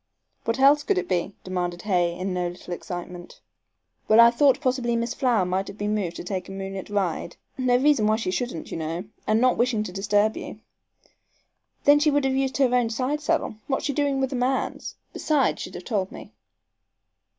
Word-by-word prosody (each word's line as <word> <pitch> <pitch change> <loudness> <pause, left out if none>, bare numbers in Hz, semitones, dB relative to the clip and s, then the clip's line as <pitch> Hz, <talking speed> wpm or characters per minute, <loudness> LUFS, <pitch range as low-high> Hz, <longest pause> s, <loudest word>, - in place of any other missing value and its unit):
"What 230 - 0
else 280 +2 +6
could 390 +6 0
it - - -1
be?" 185 +1 -1
demanded 180 -1 -3
Hay, 175 -4 +1
in 185 +1 -3
no 180 -1 -1
little 175 0 -7
excitement. 175 0 -7 0.7
"Well, 220 +1 +5
I 235 0 +9
thought 275 +3 +4
possibly 255 -4 0
Miss 235 +1 -1
Flower 245 -9 +2
might 185 +2 -1
have 205 - -9
been 210 0 -1
moved 190 -5 -2
to - - -6
take 185 +1 -4
a - - -7
moonlight 195 0 -6
ride. 190 -4 -2 0.2
No 255 -2 +2
reason 265 -5 +3
why 215 - +3
she 220 -4 -2
shouldn't, 240 -6 -4
you - - -3
know, 165 +2 -3 0.2
and 215 +1 +3
not 255 +1 +3
wishing 240 -3 +2
to 190 - -6
disturb 205 +3 +1
you - - -7 0.6
" - - -45
"Then 290 +1 +7
she 300 +1 +3
would 290 -1 +2
have 265 - +1
used 265 0 0
her 265 -3 +3
own 245 -2 +2
side 260 +6 -1
saddle. 250 -7 -1
What's 270 - -1
she 285 - 0
doing 280 -1 0
with 265 0 -1
a - - -2
man's? 255 +1 -1 0.2
Besides, 300 -3 +1
she'd - - -7
have - - -7
told 200 -5 -1
me!" - - -10
225 Hz, 205 wpm, -25 LUFS, 185-265 Hz, 0.7 s, I